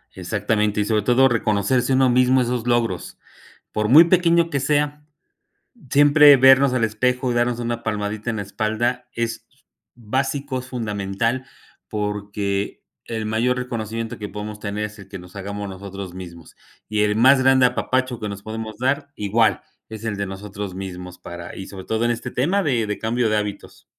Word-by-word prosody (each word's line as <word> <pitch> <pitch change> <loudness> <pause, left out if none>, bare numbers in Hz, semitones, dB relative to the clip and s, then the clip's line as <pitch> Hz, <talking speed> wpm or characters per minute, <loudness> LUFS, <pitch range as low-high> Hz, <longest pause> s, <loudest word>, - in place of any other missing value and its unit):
Exactamente 105 -1 0
y - - 0
sobre 105 -2 +1
todo, 125 +4 +5
reconocerse 120 +3 +1
uno 130 -1 +4
mismo 125 +1 +4
esos 120 -1 -1
logros, 115 -7 -1 0.5
por 105 0 -1
muy 155 +7 +9
pequeño 170 -1 +3
que 140 - -1
sea, 150 +1 0 0.9
siempre 145 0 +7
vernos 135 +1 +6
al 125 -3 +1
espejo 125 +4 0
y - - -3
darnos 120 0 +1
una 120 0 -3
palmadita 105 +1 -3
en 110 - -3
la 105 - -2
espalda 115 +4 -2
es 115 0 -3 0.5
básico, 130 +3 -2
es 130 - -12
fundamental, 115 +1 -2 0.4
porque 105 -1 -3 0.2
el 110 -2 -4
mayor 115 +4 +1
reconocimiento 115 -1 -4
que 105 - -5
podemos 105 +1 -7
tener 105 0 -3
es 105 0 -7
el 95 - -13
que 95 - -8
nos 90 +1 -14
hagamos 100 +1 -5
nosotros 95 -1 -8
mismos. 85 -3 -10 0.3
Y 105 -1 +1
el 105 0 +1
más 130 +3 +6
grande 130 -1 +5
apapacho 130 0 -1
que 105 - -3
nos 100 0 -7
podemos 110 -1 -6
dar 140 +3 0
igual 105 0 +1 0.3
es 110 0 -9
el 110 -2 -2
de 100 0 -2
nosotros 100 0 -7
mismos 90 -1 -7
para 85 -1 -9
y 95 - -7
sobre 95 -2 -9
todo 110 +1 0
en 120 - +2
este 115 - -5
tema 180 +10 +1
de 120 -8 0
de 105 - -3
cambio 115 +1 0
de 110 - +1
hábitos. 105 -1 -5
110 Hz, 175 wpm, -22 LUFS, 105-125 Hz, 0.9 s, muy